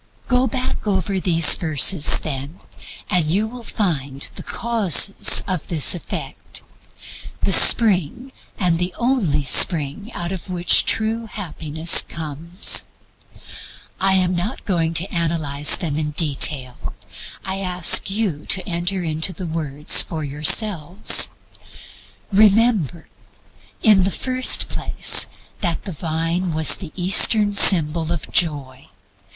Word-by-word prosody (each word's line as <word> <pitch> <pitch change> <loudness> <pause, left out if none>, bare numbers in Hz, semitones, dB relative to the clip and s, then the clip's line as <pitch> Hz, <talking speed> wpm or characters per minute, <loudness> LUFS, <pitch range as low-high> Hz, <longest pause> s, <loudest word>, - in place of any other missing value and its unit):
Go 250 0 0
back 255 -2 -6
over 190 -1 -3
these 165 -3 +4
verses, 155 0 +2
then, 145 +3 -7 0.5
and 180 -4 +2
you 190 +8 -2
will 245 +2 -12
find 140 - -4
the - - -10
Causes 210 -5 +3
of 185 -5 -5
this 160 -5 +2
Effect, 175 - -7 0.8
the - - -1
spring, 225 - +4 0.3
and 175 -4 -1
the 180 0 -5
only 220 - -2
spring, 155 - +2
out 175 0 -6
of 190 -1 -9
which 180 -1 +2
true 225 +1 -2
Happiness 165 -4 +1
comes. 165 +4 -2 1.1
I 190 0 +1
am 185 -1 -1
not 175 +5 -6
going 165 -4 -3
to 165 - -1
analyze 155 -4 +1
them 155 -5 -5
in 150 -1 -3
detail. 145 -4 -1 0.5
I 190 0 -3
ask 180 -1 +3
you 195 -7 -5
to 190 +2 -1
enter 180 +1 -4
into 160 +3 -3
the 180 +2 -9
words 150 -3 +1
for 160 -2 -7
yourselves. 155 +5 +2 1.0
Remember, 205 - 0 0.8
in 205 -4 +3
the 190 - -1
first 255 +5 0
place, - - +2 0.3
that 175 -5 -3
the 195 - -8
Vine 165 +2 -4
was 160 0 +5
the 175 -5 -10
Eastern 205 +3 +3
symbol 165 -4 +4
of 170 -3 -6
Joy. 140 -6 -2
175 Hz, 125 wpm, -18 LUFS, 155-195 Hz, 1.1 s, was